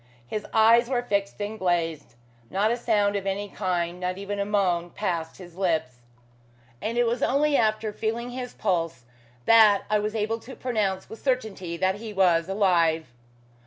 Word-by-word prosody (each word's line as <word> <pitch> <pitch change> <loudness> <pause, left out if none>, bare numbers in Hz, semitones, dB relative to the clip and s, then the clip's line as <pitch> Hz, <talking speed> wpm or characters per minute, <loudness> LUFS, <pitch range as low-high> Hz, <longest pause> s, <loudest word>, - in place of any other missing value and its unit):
His 210 - -5
eyes 230 +2 +5
were 245 -2 0
fixed 200 -4 -1
and 215 +2 -4
glazed. 165 -7 -1 0.3
Not 205 +3 +1
a - - +2
sound 210 -4 +1
of 195 -1 -2
any 200 +1 -2
kind, 180 -3 -2
not 180 0 -2
even 200 +1 -4
a 200 - 0
moan, 185 -4 +1
passed 170 -4 -3
his 175 -3 -12
lips; 160 -9 -1 0.8
and 230 +2 -2
it 240 - +4
was 235 +2 -1
only 285 +2 +2
after 215 -2 +1
feeling 230 +3 -3
his 250 0 -6
pulse 165 - -1 0.4
that 220 -3 +6
I 210 - +4
was 210 +1 -3
able 220 +1 -1
to 255 +4 -11
pronounce 210 -6 -1
with 225 - -11
certainty 215 -10 -2
that 190 +2 +1
he 220 0 -7
was 180 -3 +3
alive. 170 -6 +2
205 Hz, 170 wpm, -26 LUFS, 180-225 Hz, 0.8 s, that